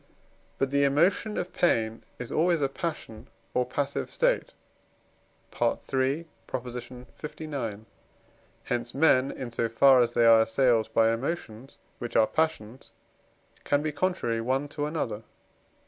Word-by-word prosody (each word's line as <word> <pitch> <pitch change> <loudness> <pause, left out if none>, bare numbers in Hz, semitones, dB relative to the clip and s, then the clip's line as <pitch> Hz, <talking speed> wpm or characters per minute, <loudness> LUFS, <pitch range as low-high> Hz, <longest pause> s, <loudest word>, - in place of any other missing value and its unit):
But 135 -1 0
the 140 0 +3
emotion 175 +9 +2
of 180 0 -3
pain 115 -9 +1
is 125 - -6
always 170 +1 +2
a 140 - +2
passion 135 -7 -6 0.3
or 125 0 +1
passive 140 +2 -2
state - - +1 1.1
(III. 135 +5 0 0.3
lix.); 125 +1 -6 0.9
hence 120 -1 -3
men, 135 -3 +4
in 125 -3 -6
so 115 0 -1
far 130 +3 +6
as 120 -1 +2
they 120 -1 +3
are 115 -1 +7
assailed 115 -1 +2
by 115 0 +4
emotions 130 -2 -5 0.2
which 120 -2 -6
are 110 - +6
passions, 130 -5 -2 0.7
can 145 0 +1
be 155 - -1
contrary 145 -9 -1
one 130 +4 -1
to 145 0 -3
another. 120 -9 -3
130 Hz, 130 wpm, -27 LUFS, 115-150 Hz, 1.1 s, are